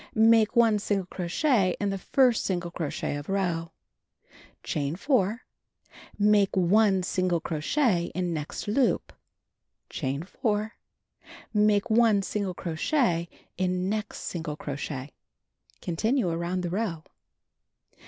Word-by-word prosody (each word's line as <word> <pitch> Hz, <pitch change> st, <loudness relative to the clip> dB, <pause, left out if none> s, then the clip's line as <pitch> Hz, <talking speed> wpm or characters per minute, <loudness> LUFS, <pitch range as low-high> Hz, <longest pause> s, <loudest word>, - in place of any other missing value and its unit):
Make 225 Hz, 0 st, +5 dB
1 225 Hz, -3 st, +4 dB
single 200 Hz, -2 st, -1 dB
crochet 185 Hz, -, +1 dB
in 205 Hz, -1 st, 0 dB
the 195 Hz, -, -3 dB
first 250 Hz, +2 st, +3 dB
single 175 Hz, -2 st, -2 dB
crochet 155 Hz, -3 st, -3 dB
of 145 Hz, +4 st, -8 dB
row. 175 Hz, -4 st, -1 dB, 0.9 s
Chain 145 Hz, +1 st, -2 dB
4. 225 Hz, -, +1 dB, 0.8 s
Make 205 Hz, -1 st, +3 dB
1 190 Hz, +1 st, +4 dB
single 185 Hz, -1 st, 0 dB
crochet 170 Hz, -, 0 dB
in 180 Hz, -1 st, -1 dB
next 150 Hz, +4 st, -5 dB
loop. 240 Hz, +5 st, +1 dB, 0.8 s
Chain 140 Hz, 0 st, -3 dB
4. 210 Hz, +3 st, -2 dB, 0.8 s
IMake 210 Hz, +1 st, +3 dB
1 220 Hz, -3 st, +4 dB
single 195 Hz, -2 st, -3 dB
crochet 170 Hz, -, 0 dB, 0.3 s
in 185 Hz, 0 st, 0 dB
next 210 Hz, 0 st, -3 dB
single 160 Hz, -4 st, -4 dB
crochet. 140 Hz, -1 st, -5 dB, 0.7 s
Continue 220 Hz, +5 st, 0 dB
around 170 Hz, +2 st, -2 dB
the 175 Hz, -1 st, -3 dB
row. 185 Hz, -5 st, -2 dB
190 Hz, 115 wpm, -27 LUFS, 170-215 Hz, 0.9 s, Make